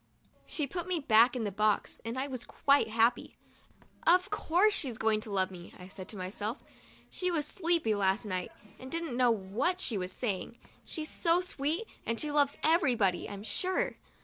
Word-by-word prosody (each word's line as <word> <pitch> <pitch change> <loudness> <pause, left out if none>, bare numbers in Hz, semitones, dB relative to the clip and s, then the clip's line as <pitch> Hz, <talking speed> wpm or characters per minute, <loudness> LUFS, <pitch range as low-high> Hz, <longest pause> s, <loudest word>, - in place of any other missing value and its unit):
She 300 - -1
put 345 +5 -5
me 360 -2 0
back 240 -2 +5
in 245 - -2
the 205 - -2
box 210 +1 0
and 230 +2 -4
I 265 +2 -1
was 255 -3 -5
quite 280 -4 +2
happy. 230 +2 +1 0.7
'Of 365 +4 +5
course 415 +1 +3
she's 260 - 0
going 220 -1 +1
to 215 - -10
love 190 -1 +1
me," 175 -2 -11
I 180 - -11
said 190 0 -9
to 210 - -6
myself, 205 +6 -3 0.5
'she 365 - -2
was 315 -4 0
sleepy 335 - +1
last 200 +2 +1
night 185 -3 -3 0.3
and 260 - -9
didn't 330 -6 -2
know 250 -1 +4
what 230 - 0
she 225 - 0
was 180 0 -4
saying. 220 0 -3 0.3
She's 310 -2 -4
so 335 +1 +2
sweet 325 +1 -1 0.2
that 230 0 -2
she 300 - -1
loves 285 -1 +2
everybody, 250 - +2
I'm 200 -1 -7
sure." 370 +11 -1
245 Hz, 185 wpm, -31 LUFS, 210-320 Hz, 0.7 s, back